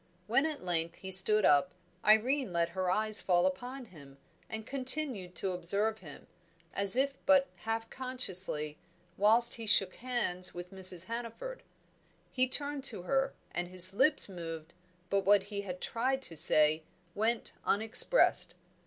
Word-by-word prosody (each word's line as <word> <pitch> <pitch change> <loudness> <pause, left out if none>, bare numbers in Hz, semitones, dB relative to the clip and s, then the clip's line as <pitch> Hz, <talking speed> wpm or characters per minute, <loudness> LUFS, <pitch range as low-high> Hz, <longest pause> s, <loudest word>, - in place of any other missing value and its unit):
When 260 +9 0
at 305 -8 -7
length 170 -1 -3
he 190 - -10
stood 205 +3 +4
up, 145 +5 +2 0.3
Irene 235 +3 +1
let 170 -1 -1
her 185 -1 -4
eyes 215 +3 +6
fall 175 -1 +1
upon 245 +8 -5
him, 140 -9 -17 0.3
and 220 0 -7
continued 260 -9 0
to 190 - -4
observe 200 +5 -3
him, 150 -6 -14 0.5
as 200 +1 +6
if 275 +2 0
but 280 -1 +3
half 225 0 -5
consciously 185 - -3 0.4
whilst 230 +4 +2
he 225 -1 -9
shook 195 -3 +1
hands 235 -9 -2
with 175 +1 -10
Mrs. 185 -2 +2
Hannaford. 235 - -8 0.7
He 255 0 0
turned 285 +1 -1
to 205 -9 -2
her, 270 +6 -2 0.2
and 175 0 -5
his 185 +1 +6
lips 265 +8 +2
moved, 165 -3 -9 0.4
but 200 - +1
what 195 0 +2
he 200 0 -7
had 180 -2 -8
tried 265 +3 -3
to 165 - -3
say 155 -1 +1 0.3
went 220 +3 -3
unexpressed. 225 - +3
205 Hz, 150 wpm, -30 LUFS, 180-250 Hz, 0.7 s, eyes